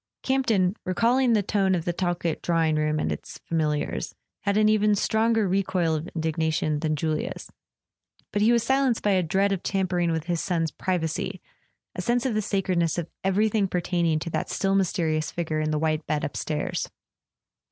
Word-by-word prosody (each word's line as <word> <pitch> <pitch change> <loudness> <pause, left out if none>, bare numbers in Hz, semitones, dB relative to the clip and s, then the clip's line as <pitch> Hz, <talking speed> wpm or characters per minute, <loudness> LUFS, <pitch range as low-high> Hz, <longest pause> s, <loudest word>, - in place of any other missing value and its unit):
Campton, 225 -8 +2
recalling 235 +7 +2
the 210 -2 +3
tone 195 -2 +2
of 170 -2 -3
the 175 - 0
Talkett 175 -2 -1
draw¬ 165 -2 +2
ing 155 -1 +1
room 155 0 +1
and - - -1
its - - -6
familiars, 155 -3 -1 0.2
had 200 0 0
an 215 0 +5
even 210 -1 +3
stronger 220 +1 +2
recoil 185 -3 +1
of 155 +2 -2
indignation 160 -1 0
than 155 0 0
Julia's; 155 +1 -3 0.8
but 205 - +1
he 220 +3 +5
was 235 -2 +3
silenced 265 -3 +2
by 205 - +3
a 190 -1 +3
dread 190 +4 +1
of 195 -3 -1
tampering 185 -3 0
with 160 -1 -1
his 170 0 -1
son's 165 -4 -1
privacy, 170 -2 -2 0.5
a - - -4
sense 240 +1 +1
of 255 - +1
the 215 - +1
sacredness 185 -5 0
of 170 -2 -4
everything 205 +1 +2
pertaining 175 -3 0
to 165 +2 -4
that - - -2
still 195 0 0
mysterious 170 -5 +1
figure 160 -2 -2
in 155 0 0
the 155 - 0
white 155 0 -1
bed 150 -1 -1
upstairs. 150 +1 -2
180 Hz, 180 wpm, -26 LUFS, 160-205 Hz, 0.8 s, an